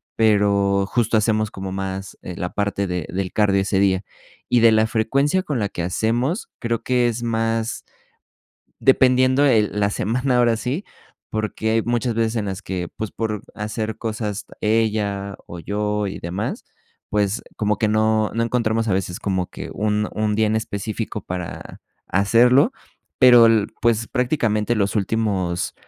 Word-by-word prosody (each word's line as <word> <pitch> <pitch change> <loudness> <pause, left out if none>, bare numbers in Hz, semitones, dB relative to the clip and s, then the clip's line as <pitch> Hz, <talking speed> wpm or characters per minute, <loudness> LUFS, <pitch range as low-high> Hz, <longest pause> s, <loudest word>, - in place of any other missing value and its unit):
pero 100 -2 +3
justo 115 -1 +1
hacemos 110 0 +1
como 95 0 -6
más, 95 0 -5
eh, 90 - -6
la 90 - -3
parte 100 -1 -1
de 90 -3 -3
del 95 0 -2
cardio 100 -2 +3
ese 95 0 0
día. 95 -1 +2 0.5
Y 120 - +4
de 115 0 +6
la 110 0 +3
frecuencia 140 +11 +1
con 145 -9 -2
la 100 -1 -1
que 85 - -4
hacemos, 120 - -1
creo 115 -1 -2
que 125 -1 +2
es 120 +1 -2
más, 115 0 -1 1.0
dependiendo, 130 +1 +4
eh, 110 -5 +4
la 105 0 0
semana, 125 +5 0
ahora 120 -2 +3
sí, 130 - -3 0.5
porque 110 0 -2
hay 115 -1 +2
muchas 120 0 -1
veces 115 0 0
en 105 -2 -1
las 95 +1 -4
que, 90 -2 -4
pues, 110 -2 -4
por 110 -3 -3
hacer 110 +1 -4
cosas 110 -2 -3 0.2
ella 105 -3 0
o 85 - -8
yo 105 +2 -1
y 95 - -5
demás, 90 +5 -4 0.5
pues, 105 +1 0
como 105 -1 0
que 110 - +1
no 110 0 +2
no 115 - +1
encontramos 115 -1 0
a 95 - +2
veces 90 -1 -3
como 95 -3 -1
que - - -8
un 105 0 0
un 105 -1 0
día 110 -1 +3
en 110 +1 +1
específico 110 0 -4
para 90 -2 -7 0.3
hacerlo, 115 +8 +4 0.5
pero 120 -2 +8
el, 110 -2 +3 0.2
pues, 115 -1 +2
prácticamente 120 -4 0
los 100 0 0
últimos 95 -4 -1
110 Hz, 160 wpm, -21 LUFS, 100-115 Hz, 1.0 s, pero